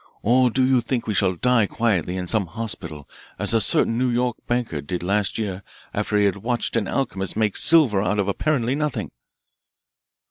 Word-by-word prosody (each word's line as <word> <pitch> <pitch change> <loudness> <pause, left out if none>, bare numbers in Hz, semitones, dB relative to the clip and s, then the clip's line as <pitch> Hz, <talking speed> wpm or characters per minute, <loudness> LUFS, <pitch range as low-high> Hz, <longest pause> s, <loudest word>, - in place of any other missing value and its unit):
Or 125 +3 +4
do 130 +2 +1
you 130 -1 +3
think 120 0 -3
we 110 - -2
shall 95 -1 +1
die 120 +2 +2
quietly 95 -7 -1
in 90 - -3
some 100 0 +1
hospital 85 -7 -5 0.3
as - - +2
a 115 - +4
certain 115 +3 +2
New 130 0 +1
York 120 0 0
banker 120 -11 -2
did 85 +5 -5
last 100 +2 0
year 100 -4 -4 0.3
after 105 - -1
he 105 - +3
had 100 0 0
watched 120 +4 -2
an 110 -4 0
alchemist 100 -9 -2
make 110 -3 0
silver 145 -12 +4
out 105 +1 0
of 100 -1 0
apparently 125 +3 0
nothing!" 150 -1 -3
110 Hz, 185 wpm, -22 LUFS, 95-125 Hz, 0.3 s, Or